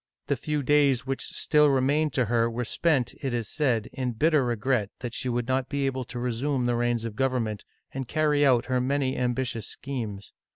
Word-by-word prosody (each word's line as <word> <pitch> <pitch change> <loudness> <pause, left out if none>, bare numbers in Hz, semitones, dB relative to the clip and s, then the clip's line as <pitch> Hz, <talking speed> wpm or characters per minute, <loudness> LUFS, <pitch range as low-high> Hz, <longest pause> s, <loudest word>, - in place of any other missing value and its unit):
The - - 0
few 150 -2 -2
days 140 -2 +3
which 135 0 -2
still 150 -1 +3
remained 140 +3 +2
to 125 - +2
her 115 +1 +2
were 120 +1 -3
spent, 140 0 +1
it 135 -4 -1
is" 115 -3 -2
said, 125 -7 0
in 130 -2 -2
bitter 150 +4 +3
regret 120 -2 0
that 120 -2 -5
she 130 - -3
would 120 0 -1
not 130 0 0
be 140 -1 -1
able 130 -1 -2
to 125 - -8
resume 125 +2 -1
the 120 - +1
reins 120 -1 0
of 110 -2 -5
government 125 -5 -1 0.3
and 135 -2 -5
carry 150 0 +2
out 125 -4 +4
her 130 -1 0
many 135 0 0
ambitious 125 -2 -2
schemes. 110 -8 -6
130 Hz, 200 wpm, -27 LUFS, 120-140 Hz, 0.3 s, out